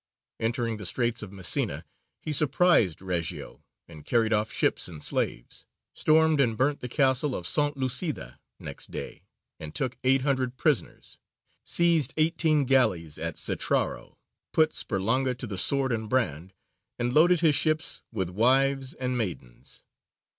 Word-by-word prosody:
Entering 115 0 -1
the 105 -3 -3
Straits 120 +1 0
of 105 -3 -8
Messina, 95 -3 0 0.4
he 155 - -3
surprised 140 - +3
Reggio, 90 -3 -4 0.2
and 80 -3 -13
carried 115 +4 +1
off 105 0 0
ships - - 0
and 80 -4 -8
slaves; - - -2 0.3
stormed 155 -1 +3
and 115 -4 +1
burnt 140 +4 +1
the 125 - -6
castle 135 +1 +1
of 90 - -5
S. - - 0 0.2
Lucida 130 - -3 0.2
next - - -8
day, - - -7 0.4
and 75 -1 -8
took 130 -2 -3
eight 130 0 +3
hundred 130 -3 -1
prisoners; 150 -4 -2 0.4
seized 165 -6 +2
eighteen 155 -2 +2
galleys 95 - +1
at 85 -1 -4
Cetraro; - - -1 0.4
put 155 -1 +3
Sperlonga 125 +6 0
to 125 - -5
the 100 -5 -3
sword 135 +2 +2
and 110 -2 -3
brand, 95 - -1 0.5
and 120 +1 -2
loaded 170 +3 +4
his 160 -3 +4
ships 155 +2 +1
with 95 -6 -3
wives 135 - +2
and 125 -2 -3
maidens. 85 - -7
125 Hz, 145 wpm, -27 LUFS, 105-145 Hz, 0.5 s, loaded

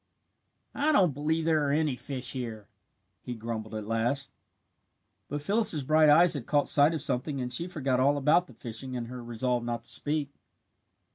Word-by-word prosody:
"I 300 +2 +1
don't 185 - +3
believe 155 +3 -1
there 160 -2 +2
are - - 0
any 150 -2 +1
fish 130 -1 -3
here," 115 -5 -6 0.5
he 125 - -6
grumbled 110 -1 -6
at 110 -1 -5
last. 120 +6 -1 1.0
But 145 +1 -5
Phyllis's 200 -5 +2
bright 155 +2 +4
eyes 170 +4 +6
had 140 -6 -6
caught 145 -1 +2
sight 145 +3 +4
of 155 - -3
something 135 +2 -2
and 125 -1 -4
she 170 +7 -1
forgot 140 -8 -1
all 140 +2 +3
about 155 +6 +3
the 125 - -16
fishing 120 +3 -6
and 120 -1 -5
her 125 -1 -8
resolve 120 +1 -2
not 120 -1 -4
to - - -4
speak. 145 -1 -1
135 Hz, 185 wpm, -28 LUFS, 120-155 Hz, 1.0 s, eyes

